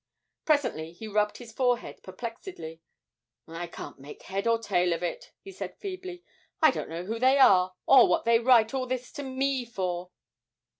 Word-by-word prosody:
Presently 210 - 0
he 220 +6 -9
rubbed 210 0 0
his 235 -2 -11
forehead 245 +1 -1
perplexedly: 185 - -8 0.7
'I 165 +2 -6
can't 170 - -9
make 140 +2 -12
head 195 +3 -3
or 230 0 +4
tail 180 -6 +1
of 165 +1 -4
it,' - - -4
he 390 - -9
said 380 - -7
feebly; 370 -2 -7 0.4
'I 315 -3 +6
don't - - -5
know 170 +2 -5
who 225 +3 -4
they 260 +3 +4
are, 185 -8 +5
or 265 -3 +7
what - - +1
they 230 0 +5
write 235 -2 +4
all 260 -1 -2
this 255 -1 -4
to 290 - -7
me 265 -1 -1
for!' 185 -6 -4
230 Hz, 180 wpm, -28 LUFS, 180-265 Hz, 0.7 s, or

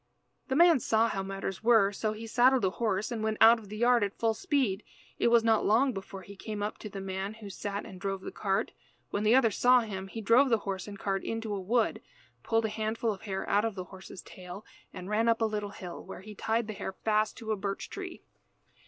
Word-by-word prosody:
The 265 - -1
man 340 -2 +6
saw 225 0 +2
how 195 - -2
matters 195 0 -5
were, 225 -4 +5
so 215 +1 -2
he 220 +1 -8
saddled 245 +1 +4
a 185 - +1
horse 215 0 -1
and 230 -2 -3
went 220 0 -1
out 225 +1 +8
of 210 -3 -14
the 215 - -6
yard 240 0 +4
at 200 -1 -3
full 225 -1 +1
speed. 255 - 0 0.4
It - - +3
was 235 -1 +5
not 225 -1 +3
long 245 +5 +3
before 195 -1 -8
he 200 +3 -11
came 210 +1 -5
up 210 - -4
to 215 - -7
the 195 - -7
man 195 +2 -4
who 210 -3 -9
sat 200 +1 -4
and 190 -4 -11
drove 195 -1 -2
the - - -7
cart. 195 -2 -1 0.4
When 205 - -1
the 215 +3 +4
other 245 -4 +4
saw 250 +3 +5
him 195 -4 -5
he 225 - -7
drove 230 +6 +4
the 230 - +4
horse 190 -1 -3
and 200 -1 -8
cart 195 -1 -2
into 225 -2 -3
a 200 - -3
wood, 225 +4 +1 0.4
pulled 225 0 +1
a - - 0
handful 220 +1 -1
of 190 - -12
hair 195 -2 -4
out 205 +1 +3
of 225 -3 -2
the 185 - -4
horse's 190 -1 -10
tail, 185 +3 -10 0.3
and 185 - -8
ran 220 +3 +2
up 230 - +3
a 225 - +2
little 210 -1 -2
hill, 180 -3 -8
where - - -9
he 210 +2 -10
tied 225 +3 -1
the 215 - -5
hair 190 - -5
fast 215 +1 0
to 225 -2 -5
a - - +2
birch 195 0 -4
tree. 375 -3 -8
215 Hz, 245 wpm, -30 LUFS, 195-230 Hz, 0.4 s, out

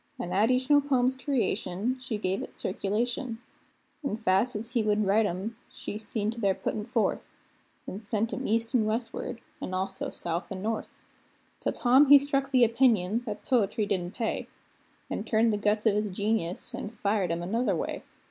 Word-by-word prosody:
An' 175 - -4
at 210 +5 +3
each 255 0 +2
new 290 0 +6
poem's 260 -2 +2
creation 250 - -1
she 240 -4 -3
gave 190 -1 -1
it - - -8
circulation; 230 +6 -1 0.7
An' 220 -7 -1
fast 220 +2 +2
as 225 +3 -5
he 245 -2 +2
would 210 -1 +2
write 205 +2 +3
'em, 205 +5 -4
she 210 - -6
seen 215 -1 -2
to 230 0 -7
their 195 -2 +2
puttin' 215 0 -3
forth, 235 -3 0 0.6
An' 190 - -6
sent 220 +2 -2
'em 265 - -3
east 230 +1 0
an 235 -4 +3
westward, 230 +1 -3 0.2
an' 185 - -3
also 190 +1 -2
south 170 +3 -3
an' 190 0 -5
north. 220 0 -2 0.7
Till - - -1
Tom 260 +4 +5
he 285 +1 +10
struck 275 -1 0
the 255 -3 +5
opinion 230 -3 +3
that 210 - -5
poetry 225 -3 +2
didn't 185 -1 -2
pay, 225 - -2 0.6
An' - - -3
turned 225 0 +2
the - - +1
guns 210 +1 +1
of 220 - +5
his 210 +1 0
genius, 195 -2 -2
an' - - -4
fired 205 -4 0
'em 170 +1 -2
another 215 +2 +1
way. - - -3
220 Hz, 185 wpm, -28 LUFS, 200-245 Hz, 0.7 s, he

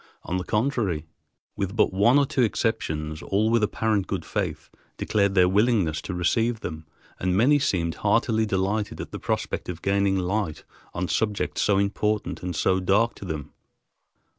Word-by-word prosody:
On 90 - -2
the 90 - -2
contrary, 105 - 0 0.5
with 100 0 -3
but 110 - +3
one 105 +8 +4
or 140 - +4
two 130 - -1
exceptions, 80 -10 -1
all 105 +3 +1
with 115 -1 +3
apparent 105 -1 0
good - - -3
faith - - -3 0.3
declared 100 -2 +1
their 90 -1 +6
willingness 95 -6 +2
to 90 - -5
receive 110 +6 +1
them, 80 0 -6 0.3
and 90 0 0
many 140 +7 +5
seemed 85 -10 0
heartily 110 +1 +2
delighted 100 +2 -1
at - - -6
the - - -6
prospect - - -3
of 85 -2 -6
gaining 100 0 +2
light 95 -3 -2 0.3
on 90 +1 -1
subjects 105 +1 -1
so 100 - +3
important 105 +1 -1
and 90 -1 -4
so 95 +3 +2
dark 100 +6 +2
to - - -10
them. 75 -4 -5
100 Hz, 165 wpm, -25 LUFS, 90-110 Hz, 0.5 s, their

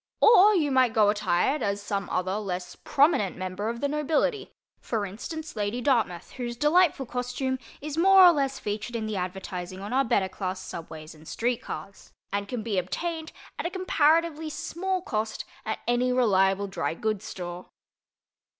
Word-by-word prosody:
Or 425 -2 +7
you 300 -6 +2
might 255 -3 +4
go 210 -2 +5
attired 215 +7 +1
as 200 -2 0
some 200 -2 -3
other 185 +2 -1
less 185 -4 -4
prominent 275 - +2
member 185 +3 -3
of 235 0 -5
the 285 - +1
nobility—for 300 - -2
instance, 305 - -7
Lady 210 +3 -1
Dartmouth, 230 -10 0
whose 240 -2 -5
delightful 300 0 +3
costume 250 +2 -2 0.2
is 300 +2 -4
more 380 +1 +8
or 350 - +9
less 275 -4 0
featured 210 +3 -4
in 225 -1 -2
the 215 -1 -3
advertising 185 0 -5
on 205 +5 -5
our 270 +1 +4
better 195 -6 +1
class 185 0 -4
subways 160 -3 -8
and 155 0 -16
street 240 +1 -1
cars, 195 - -8 0.2
and 200 0 -1
can 235 0 -4
be 205 -4 0
obtained 320 - -4 0.3
at - - -1
a - - -3
comparatively 325 -3 +2
small 370 +4 -3
cost 220 -4 -3 0.2
at 220 - -1
any 245 +1 +2
reliable 200 -5 +3
dry 180 -4 -3
goods 215 +1 -2
store. 175 -1 -7
230 Hz, 165 wpm, -27 LUFS, 195-295 Hz, 0.3 s, or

